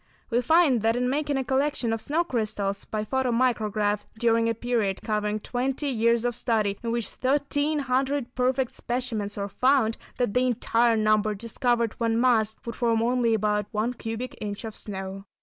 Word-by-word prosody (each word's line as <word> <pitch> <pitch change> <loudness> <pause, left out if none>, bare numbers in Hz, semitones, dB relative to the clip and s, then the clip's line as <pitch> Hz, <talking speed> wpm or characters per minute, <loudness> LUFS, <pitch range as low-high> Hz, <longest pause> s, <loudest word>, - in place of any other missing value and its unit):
We 240 +1 +3
find 290 -3 +4
that 225 +1 +2
in 250 +1 0
making 290 0 0
a 265 - 0
collection 265 -3 0
of 225 - -3
snow 315 +7 0
crystals 210 - -2
by 215 -1 -3
photo 265 +2 0
micrograph, 215 -4 +1 0.2
during 230 0 +2
a 230 - 0
period 225 -5 -1
covering 210 -1 -1
twenty 260 +6 -2
years 235 -1 +2
of 245 - +1
study, 215 -4 0
in 235 - -3
which 235 -1 -1
thirteen 285 +3 0
hundred 265 -1 -1
perfect 255 0 0
specimens 235 -5 -3
were 200 0 -2
found, 240 +2 +2 0.2
that 245 -5 0
the 250 +1 +2
entire 235 -1 +2
number 215 0 +2
discovered, 235 +1 0
when 230 -1 +1
massed, 225 -3 +2
would 235 -1 -5
form 230 -2 +1
only 240 -1 +2
about 210 -1 0
one 220 +3 -1
cubic 225 +1 -5
inch 205 0 -4
of 220 -1 -6
snow. 195 -1 -6
235 Hz, 175 wpm, -26 LUFS, 215-255 Hz, 0.2 s, find